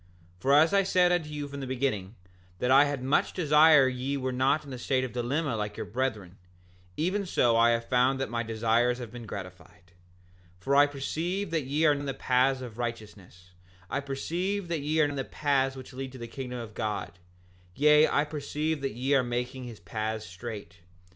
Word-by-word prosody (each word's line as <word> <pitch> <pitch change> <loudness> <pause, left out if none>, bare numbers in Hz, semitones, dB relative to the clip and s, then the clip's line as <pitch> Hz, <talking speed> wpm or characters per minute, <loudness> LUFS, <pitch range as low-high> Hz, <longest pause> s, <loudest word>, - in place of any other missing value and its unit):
7:18 - - -30
For 140 - +3
as 160 +5 +5
I 200 - +5
said 180 -2 +3
unto 170 -4 0
you 150 -1 -5
from 140 0 -7
the 135 - -5
beginning, 120 -6 -2 0.4
that 125 +6 0
I 140 +2 +7
had 145 -3 -3
much 135 +3 +1
desire 150 -3 +6
that 130 - +1
ye 130 +3 -3
were 130 -1 -2
not 135 +4 +1
in 140 - -10
the 130 - -6
state 130 +1 0
of 130 - -4
dilemma 125 +3 -1
like 105 -1 -4
your - - -4
brethren, 105 -7 -3 0.6
even 185 +6 0
so 120 -10 +2
I 115 +1 +5
have 115 0 0
found 130 +1 +2
that 135 - -1
my 115 0 -1
desires 115 +2 +1
have 120 -3 -8
been 120 -2 -9
gratified. 90 -2 -10 0.7
7:19 - - -30
For 140 +5 +1
I 145 +1 +7
perceive 165 +7 -3
that 160 -5 -1
ye 145 +4 +1
are 150 - +6
in 145 0 -4
the 135 - -3
paths 130 +1 +2
of 120 -2 -9
righteousness; 105 -6 -7 0.4
I - - 0
perceive 170 +8 -3
that 165 -3 -1
ye 155 +2 0
are - - +5
in 145 -1 -3
the 135 - -1
path 135 -1 0
which 130 0 -10
leads 130 0 -6
to - - -9
the 120 -1 -7
kingdom 125 +1 -6
of 115 -3 -7
God; 105 -5 -4 0.6
yea, 150 +2 +6
I 145 - +2
perceive 150 0 -3
that 135 -5 -3
ye 130 +4 0
are 135 - +5
making 125 +1 -4
his 115 -3 -9
paths 110 +4 -4
straight. 95 -2 -8
130 Hz, 215 wpm, -28 LUFS, 115-145 Hz, 0.7 s, I